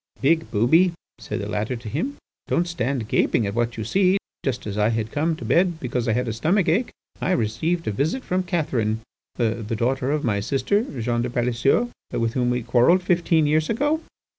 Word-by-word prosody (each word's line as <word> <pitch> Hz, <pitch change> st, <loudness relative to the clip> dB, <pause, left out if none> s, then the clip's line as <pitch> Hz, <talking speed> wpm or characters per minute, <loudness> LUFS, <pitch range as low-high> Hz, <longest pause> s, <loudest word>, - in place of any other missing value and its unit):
'Big 160 Hz, +3 st, +2 dB
booby,' 160 Hz, -, +4 dB, 0.3 s
said -, -, -4 dB
the -, -, -4 dB
latter 110 Hz, +4 st, -2 dB
to 115 Hz, -2 st, -9 dB
him, 175 Hz, -, -3 dB, 0.3 s
'don't 175 Hz, -, +1 dB
stand 135 Hz, -8 st, -2 dB
gaping 115 Hz, -, +2 dB
at 100 Hz, -, -2 dB
what 120 Hz, +1 st, -1 dB
you 110 Hz, -, -3 dB
see, 185 Hz, -, +3 dB, 0.3 s
just 130 Hz, -3 st, -2 dB
as 105 Hz, -2 st, -4 dB
I 105 Hz, +1 st, +2 dB
had 110 Hz, -1 st, -2 dB
come 160 Hz, +2 st, 0 dB
to 165 Hz, -, -8 dB
bed 175 Hz, -1 st, +2 dB
because 125 Hz, -3 st, -2 dB
had 120 Hz, +3 st, +1 dB
a 115 Hz, -, -1 dB
stomach 165 Hz, -, +1 dB
ache, 195 Hz, +10 st, +2 dB, 0.3 s
I 185 Hz, -, +1 dB
received 155 Hz, +9 st, -1 dB
a -, -, +1 dB
visit 155 Hz, -, -1 dB
from 185 Hz, +1 st, 0 dB
Catherine, 125 Hz, -, -1 dB, 0.3 s
the 115 Hz, -1 st, 0 dB
daughter 130 Hz, +3 st, 0 dB
of 150 Hz, 0 st, 0 dB
my 105 Hz, -4 st, +1 dB
sister 135 Hz, -, +1 dB, 0.2 s
Jeanne 120 Hz, +1 st, 0 dB
de 125 Hz, -, -2 dB
Palaiseau, 125 Hz, -, +1 dB, 0.2 s
with 115 Hz, -1 st, -1 dB
whom 125 Hz, -2 st, +1 dB
we 125 Hz, -1 st, 0 dB
quarrelled 125 Hz, +10 st, +4 dB
fifteen 170 Hz, -3 st, +2 dB
years 155 Hz, +1 st, +2 dB
ago. 295 Hz, +7 st, +1 dB
130 Hz, 195 wpm, -23 LUFS, 115-170 Hz, 0.3 s, booby